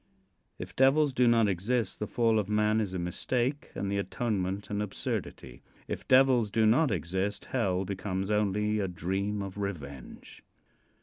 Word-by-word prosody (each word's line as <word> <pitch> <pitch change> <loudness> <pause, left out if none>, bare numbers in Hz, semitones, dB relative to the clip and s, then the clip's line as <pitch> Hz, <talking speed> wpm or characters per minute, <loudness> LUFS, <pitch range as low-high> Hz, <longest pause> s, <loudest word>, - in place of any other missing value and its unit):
If - - -8
devils 135 +2 +4
do 125 -1 +3
not 115 -2 +4
exist 100 +3 -1
the 105 - -3
fall 115 -2 +2
of 105 -1 -3
man 105 +1 +2
is 95 -3 -3
a - - -1
mistake 120 - -2
and 100 0 -3
the 100 - 0
atonement 100 -2 -2
an 105 0 -1
absurdity. 80 -9 -5 0.3
If - - -5
devils 130 -4 +5
do 110 +1 +2
not 130 +8 +4
exist 95 +2 -2
hell 95 -7 0
becomes 95 0 -3
only 105 +1 +1
a 100 - 0
dream 95 +4 -2
of 100 +1 -7
revenge. 70 -10 -7
105 Hz, 160 wpm, -29 LUFS, 95-115 Hz, 0.3 s, devils